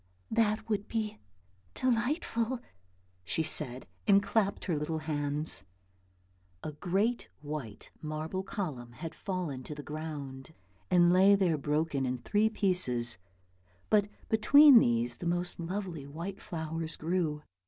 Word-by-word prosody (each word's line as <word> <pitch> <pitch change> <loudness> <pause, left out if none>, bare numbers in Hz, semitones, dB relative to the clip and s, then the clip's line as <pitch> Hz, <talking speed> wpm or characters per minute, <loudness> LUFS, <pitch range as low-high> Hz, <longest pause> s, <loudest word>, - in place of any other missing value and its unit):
" - - -35
That 215 0 0
would 210 -2 -1
be 215 - -3 0.6
delightful," 245 -1 0 0.6
she 105 - 0
said, 130 -5 +1 0.2
and 200 -1 +6
clapped 205 -2 0
her 175 - 0
little 150 +2 -2
hands. 150 -1 -1 1.0
A 155 - -3
great 195 +10 -1
white 145 -8 -6
marble 155 +4 -3
column 150 - -5
had 160 +7 -7
fallen 175 -10 -4
to 150 +4 -7
the 145 - -7
ground 150 -2 -7 0.3
and 175 -1 +5
lay 195 +2 +7
there 185 -5 +2
broken 150 -1 0
in 125 0 -1
three 210 - +1
pieces, 130 - +1 0.7
but 205 -1 +4 0.2
between 270 +5 +8
these 120 - +1
the 175 - -4
most 175 +1 -1
lovely 175 -4 -4
white 170 +7 -6
flowers 160 -2 -3
grew. 160 -3 -1
165 Hz, 130 wpm, -31 LUFS, 150-200 Hz, 1.0 s, between